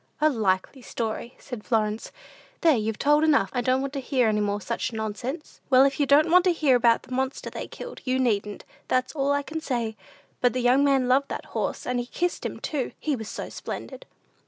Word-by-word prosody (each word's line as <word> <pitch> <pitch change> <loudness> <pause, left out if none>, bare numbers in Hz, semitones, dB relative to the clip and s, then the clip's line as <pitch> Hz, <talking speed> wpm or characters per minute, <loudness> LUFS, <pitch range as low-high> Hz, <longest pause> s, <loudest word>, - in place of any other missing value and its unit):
"A 310 0 +4
likely 215 +2 0
story," 230 +1 -4
said 245 -6 -8
Florence; 215 -2 -1 0.5
"there, 320 -3 +5
you've 220 -1 -1
told 295 +2 +3
enough! 290 -11 +3
I 245 - 0
don't 255 +2 +2
want 275 0 -4
to 280 - -2
hear 255 -2 +1
any 210 -1 +1
more 205 0 0
such 235 +4 -3
nonsense." 225 +7 -5
"Well, 260 0 +7
if 275 +1 0
you 285 - +2
don't 300 +4 +5
want 360 +1 +7
to 365 - +4
hear 295 -6 +3
about 235 -1 +3
the - - -17
monster 260 +1 -2
they - - -6
killed, - - -9
you 255 0 0
needn't; 210 -5 -1 0.2
that's 255 0 0
all 280 -2 0
I 285 0 +1
can 315 +2 -5
say; 235 -7 -2 0.5
but 245 -2 +3
the 255 - -1
young 250 +3 +4
man 270 -3 +3
loved 270 +2 +3
that - - -5
horse; - - -2
and 250 0 -1
he 240 - -4
kissed 350 +6 -2
him, - - -4
too, 285 -5 -3
he 300 -3 0
was 220 -3 -7
so - - -5
splendid!" - - -7
255 Hz, 220 wpm, -26 LUFS, 225-285 Hz, 0.5 s, Well